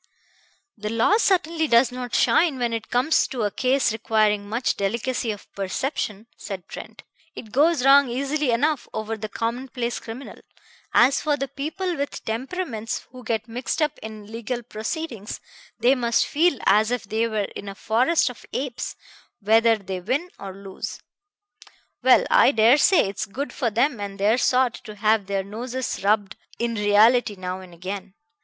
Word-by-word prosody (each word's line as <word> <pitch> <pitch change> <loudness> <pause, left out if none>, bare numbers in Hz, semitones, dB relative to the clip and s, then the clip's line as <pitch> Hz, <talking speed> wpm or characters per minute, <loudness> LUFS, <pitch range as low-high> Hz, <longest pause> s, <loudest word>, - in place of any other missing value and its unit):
"The 210 +1 -3
law 230 - +3
certainly 335 -6 +1
does 240 0 +4
not 250 -1 -5
shine 320 -5 +3
when 240 -2 -1
it 225 -1 -4
comes 255 +6 +2
to 245 -4 -3
a 205 - 0
case 260 +2 +1
requiring 215 -2 +1
much 235 +4 0
delicacy 235 +4 -1
of 205 -2 -5
perception," 210 +1 -3
said 190 -4 -7
Trent. - - -10 0.3
"It 220 - -9
goes 295 +1 +3
wrong 275 -1 +7
easily 280 +3 -1
enough 285 +4 +1
over 220 +1 -3
the 215 0 -6
commonplace 240 +2 -3
criminal. 235 +4 -9 0.5
As 260 +3 +4
for 295 -2 +1
the 275 - -2
people 330 +7 -3
with 280 0 -4
temperaments 230 -1 -4
who 255 -1 -11
get 225 -1 -2
mixed 245 +6 -3
up 300 -1 0
in 215 -1 -8
legal 235 +3 -5
proceedings, 230 - -5 0.4
they 250 +2 +5
must 235 -3 +1
feel 320 0 +2
as 215 +3 +4
if 245 -1 -1
they 220 +3 0
were 215 -3 -1
in 200 - -6
a 195 - -8
forest 250 +8 +2
of 245 - -15
apes, 260 -2 -3 0.4
whether 225 +2 +4
they 190 -2 -5
win 265 - -2
or 195 - -6
lose. 200 +1 -7 1.0
Well, - - +5
I - - +6
dare 230 +5 +5
say 365 - +5
it's 200 +3 -4
good 275 +8 -5
for 250 -4 0
them 240 +3 +1
and 200 -1 -5
their 215 +5 +3
sort 255 -1 +3
to 215 -2 -8
have 210 -1 +2
their 195 -1 -1
noses 240 +4 -4
rubbed 205 -1 +1 0.2
in 235 0 -1
reality 210 +2 +4
now 185 0 -5
and 185 -1 -12
again. 190 +3 -7
230 Hz, 165 wpm, -24 LUFS, 210-265 Hz, 1.0 s, wrong